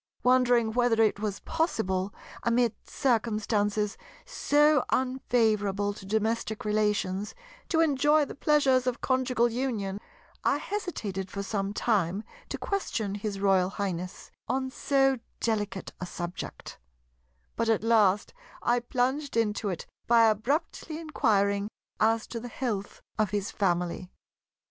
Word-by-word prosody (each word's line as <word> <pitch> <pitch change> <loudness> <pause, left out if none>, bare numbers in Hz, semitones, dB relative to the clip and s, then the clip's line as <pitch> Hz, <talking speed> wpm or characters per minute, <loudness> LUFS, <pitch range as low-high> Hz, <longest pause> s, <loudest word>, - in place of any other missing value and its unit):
Wondering 245 -3 +4
whether 240 -1 +2
it 215 -2 +3
was 205 -2 -3
possible, 205 - -1 0.3
amid 235 -1 +2 0.2
circumstances 215 -4 0 0.3
so 295 -1 +3
unfavourable 220 -6 +1
to 195 -2 -11
domestic 220 +1 -1
relations, 210 -2 0 0.3
to 325 -2 +3
enjoy 295 0 +4
the - - -8
pleasures 270 -4 +3
of 250 0 0
conjugal 255 -2 +2
union, 220 -6 -2 0.4
I - - +3
hesitated 215 - -4
for 200 +1 -4
some 200 -1 -2
time 205 -3 0 0.3
to - - -3
question 225 - -2
his 205 -1 -4
Royal 190 -2 +3
Highness 185 -2 -4 0.2
on 260 +2 -1
so 270 -1 +2 0.2
delicate 205 -4 -2
a 180 - -3
subject; 175 0 -6 0.8
but 230 0 0
at 220 -1 +2
last 210 -4 +3 0.3
I 240 +1 +3
plunged 255 +3 -1
into 210 -2 +1
it 180 - -4 0.2
by 230 -1 +6
abruptly 285 - -1
inquiring 205 -10 +1 0.3
as 225 +1 +3
to 235 - -4
the 245 - -7
health 225 -5 -4 0.2
of 215 -2 +2
his 205 +1 -2
family. 180 -2 -1
220 Hz, 125 wpm, -28 LUFS, 200-255 Hz, 0.8 s, by